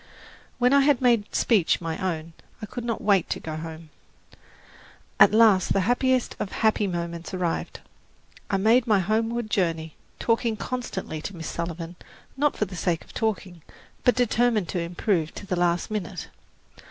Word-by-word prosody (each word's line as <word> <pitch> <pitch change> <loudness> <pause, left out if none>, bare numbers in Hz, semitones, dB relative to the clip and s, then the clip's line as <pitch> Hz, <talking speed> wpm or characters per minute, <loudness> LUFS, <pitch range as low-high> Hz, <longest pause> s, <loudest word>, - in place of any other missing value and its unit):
When 250 +2 +3
I 280 - +7
had 280 -2 +4
made 235 -5 +2
speech 205 -8 +3
my 165 -1 -3
own, 165 -4 -3 0.3
I 215 - -5
could 240 +3 -6
not 230 -2 -3
wait 200 -4 +3
to - - -2
go 155 -1 -6
home. 160 0 -8 1.3
At - - +8
last 215 -3 +5
the 195 - +2
happiest 250 +4 +1
of 195 - -3
happy 215 -2 +2
moments 170 0 -4
arrived. 175 -2 -2 0.7
I 200 - +1
had 190 - 0
made 230 +4 +4
my 215 -3 +4
homeward 220 +3 -1
journey, 165 -5 0 0.2
talking 230 -1 0
constantly 220 -11 -4
to 200 - -6
Miss 165 -1 -6
Sullivan, 170 0 -5 0.4
not 290 +2 +1
for 210 - +1
the 185 -1 -9
sake 170 -1 -1
of - - -17
talking, 195 -6 -2 0.4
but 245 - +4
determined 240 -4 +2
to 180 - -1
improve 170 -1 -1
to - - -8
the 190 -2 -1
last 175 +3 0
minute. 210 -5 -4
195 Hz, 165 wpm, -25 LUFS, 170-230 Hz, 1.3 s, At